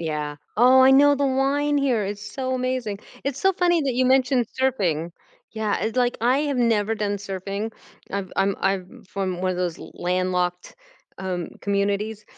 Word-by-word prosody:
Yeah. 150 -2 -3 0.2
Oh, 255 +3 +6
I 260 0 +7
know, 285 +2 +6
the 280 0 +1
wine 280 +2 +1
here 250 -7 +1
is 205 +1 -4
so 255 +5 -3
amazing. 255 -5 -2 0.3
It's 275 -1 -2
so 385 +3 +4
funny 345 -2 +2
that 270 -3 -1
you 255 +1 +2
mentioned 260 -2 +3
surfing. 175 - 0 0.4
Yeah, 220 -2 -1
it's 220 +5 -2
like, 245 -1 +2
I 250 +4 +3
have 290 -3 -1
never 225 -3 +2
done 205 -2 -1
surfing. 200 +2 -5 0.4
I've 195 -2 -3
I'm 195 0 +2
I'm 195 -1 -2
from 185 -2 -3
one 185 - 0
of 180 - -3
those 175 -2 -2
landlocked, 180 0 -2 0.4
um, 180 -2 -3
communities, 205 +1 -1
215 Hz, 170 wpm, -23 LUFS, 190-260 Hz, 0.4 s, I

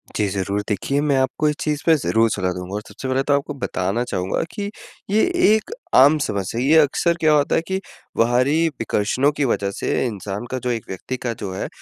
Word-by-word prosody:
जी, 105 - +1
ज़रूर। 100 +1 -1
देखिए 125 +8 0
मैं 145 -2 +2
आपको 130 +3 0
इस 150 - -1
चीज़ 150 -1 -1
पे 165 -1 +6
ज़रूर 115 -5 +2
सलाह 95 -2 -1
दूँगा। 90 +2 -7
और 105 - -3
सबसे 135 - -7
पहले 130 +1 +1
तो 145 - +1
आपको 140 +1 -1
बताना 95 +3 -1
चाहूँगा 90 -5 -2
कि 205 -2 -4 0.4
ये 215 +2 +3 0.3
एक 220 - -3 0.2
आम 145 +4 +7
समस्या 100 +3 -3
है। 130 - 0
ये 160 - +6
अक्सर 155 +3 +2
क्या 155 -2 +4
होता 145 -1 +2
है - - +2
कि 190 0 -1 0.4
बाहरी 130 +8 +3
विकर्षणों 115 +6 +1
की 145 -1 -1
वजह 100 -4 0
से - - -1
इंसान 105 -1 -4
का 130 - -2
जो 125 - -1
एक 115 -3 -3
व्यक्ति 110 +7 -5
का 120 -1 -3
जो 100 -3 -6
है, - - -3
125 Hz, 220 wpm, -21 LUFS, 100-145 Hz, 0.4 s, आम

